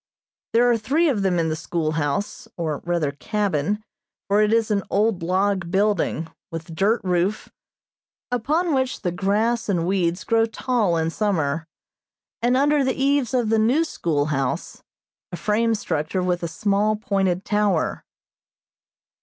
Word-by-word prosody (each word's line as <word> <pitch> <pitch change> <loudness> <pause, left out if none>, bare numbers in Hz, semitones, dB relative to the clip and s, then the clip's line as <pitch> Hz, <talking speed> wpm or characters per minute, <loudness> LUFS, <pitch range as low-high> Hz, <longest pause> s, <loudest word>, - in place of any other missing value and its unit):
There 240 +2 +5
are 230 - +2
three 300 +10 +2
of 225 -8 0
them 190 -2 +1
in 165 -1 +1
the 155 - -1
schoolhouse, 155 +2 -2
or 155 -4 -2
rather 170 -4 0
cabin, 205 +3 -1 0.4
for 205 +1 +3
it 210 0 +3
is 225 -1 +2
an 200 -1 +2
old 205 -2 +1
log 185 +1 0
building, 195 -4 +1 0.2
with 165 +1 -7
dirt 205 +7 +2
roof, 180 +3 0 0.8
upon 305 +8 +1
which 260 -1 0
the 180 - 0
grass 210 +6 0
and 175 -4 +1
weeds 180 -1 0
grow 225 -1 +2
tall 225 -6 0
in 160 0 0
summer, 165 -6 -1 0.7
and 245 +2 +3
under 290 +1 +3
the 260 -1 0
eaves 275 -3 +2
of 240 -4 +1
the 225 0 +3
new 250 +9 +3
schoolhouse, 145 - -2 0.5
a 175 - -5
frame 225 +3 +1
structure 170 -2 -2
with 180 -1 0
a 170 - -2
small 205 +5 +1
pointed 195 -3 -1
tower. 205 -5 0
200 Hz, 145 wpm, -23 LUFS, 170-225 Hz, 0.8 s, There